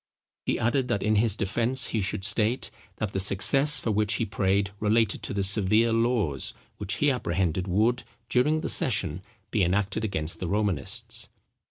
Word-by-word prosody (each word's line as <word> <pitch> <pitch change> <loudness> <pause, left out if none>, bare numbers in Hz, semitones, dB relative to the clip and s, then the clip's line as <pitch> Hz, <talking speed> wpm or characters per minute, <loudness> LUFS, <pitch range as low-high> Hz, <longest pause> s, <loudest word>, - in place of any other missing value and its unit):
He - - +1
added, 125 +3 0
that 120 -5 -1
in 105 +1 +2
his 110 -1 +4
defence 115 +5 +1
he 110 - -1
should 95 0 -2
state, 110 +4 +1 0.2
that 105 -2 -4
the 95 - -1
success 135 +9 +3
for 115 - -2
which 105 +1 +2
he 115 - -1
prayed 100 -2 0
related 110 0 +1
to - - -3
the 100 -1 -1
severe 110 +3 +2
laws, 115 - 0 0.2
which 100 +1 -1
he 145 -1 +2
apprehended 95 - -1
would, 110 +7 +1 0.3
during 150 +7 +1
the - - -3
session, 110 - +1 0.3
be 110 - +1
enacted 100 +4 0
against 90 -7 -3
the 90 - -4
Romanists. 100 -7 -2
105 Hz, 170 wpm, -26 LUFS, 95-115 Hz, 0.3 s, his